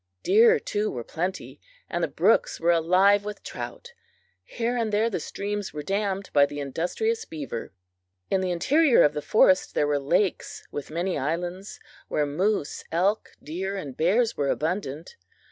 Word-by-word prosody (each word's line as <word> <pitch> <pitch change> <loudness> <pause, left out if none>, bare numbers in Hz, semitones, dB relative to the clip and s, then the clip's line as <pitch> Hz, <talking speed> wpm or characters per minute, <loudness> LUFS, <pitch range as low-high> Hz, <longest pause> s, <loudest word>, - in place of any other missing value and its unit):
Deer, 220 +5 +6
too, 210 +1 -2
were 120 - -5
plenty, 180 +9 -5 0.3
and - - -2
the - - +2
brooks - - +2
were 170 +1 +3
alive 185 +5 +4
with 210 0 -7
trout. 480 0 -8 0.5
Here 240 +1 -2
and 230 -3 -1
there 220 +3 +1
the 185 - -2
streams 205 +3 -4
were 150 - -4
dammed 195 +2 -2
by 145 -1 +5
the 145 - -7
industrious 180 - -2
beaver. 140 -7 -6 0.6
In 190 - +1
the 185 - -1
interior 270 - +4
of 150 - +3
the 150 - -3
forest 185 +1 +3
there - - +2
were 145 -1 +1
lakes 175 +7 -1
with 145 - -6
many 175 +4 -2
islands, 175 +7 -4 0.3
where 150 - 0
moose, 175 +3 -1
elk, 190 +6 +1
deer 190 +6 -4
and 140 -9 -6
bears 215 +8 +2
were 140 -1 -1
abundant. 160 -2 -3
185 Hz, 160 wpm, -26 LUFS, 155-210 Hz, 0.6 s, Deer